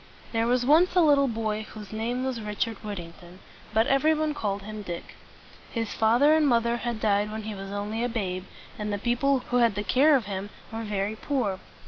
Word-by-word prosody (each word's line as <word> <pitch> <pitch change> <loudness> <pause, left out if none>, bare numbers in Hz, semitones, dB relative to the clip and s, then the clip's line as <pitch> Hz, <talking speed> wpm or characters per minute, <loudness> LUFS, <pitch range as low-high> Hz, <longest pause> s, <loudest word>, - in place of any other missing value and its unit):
There 230 0 +1
was 245 0 +2
once 325 +7 +5
a 360 - +6
little 285 -3 +5
boy 220 -2 -2
whose 215 -1 -10
name 235 +4 -2
was 255 -3 -2
Richard 210 +1 -2
Whit´ting 180 -6 -6
ton; 175 0 -14 0.3
but 220 +1 +3
everybody 305 +3 +2
called 200 -7 -3
him 215 +1 -7
Dick. 175 -4 -7 0.6
His 225 -2 -3
father 240 +7 +4
and 315 -2 +4
mother 235 -1 +2
had 240 -2 -3
died 210 0 +1
when 220 0 -5
he 215 0 -5
was 195 -1 -7
only 210 +3 -3
a 245 - 0
babe, 190 -5 -3 0.3
and 210 0 -2
the 205 - -1
people 245 +4 +1
who 245 - +3
had 235 -4 +3
the 205 - -2
care 285 +8 +5
of 250 -6 +1
him 195 0 -4 0.2
were 225 - -3
very 205 0 -2
poor. 220 -6 -1
225 Hz, 205 wpm, -27 LUFS, 205-250 Hz, 0.6 s, a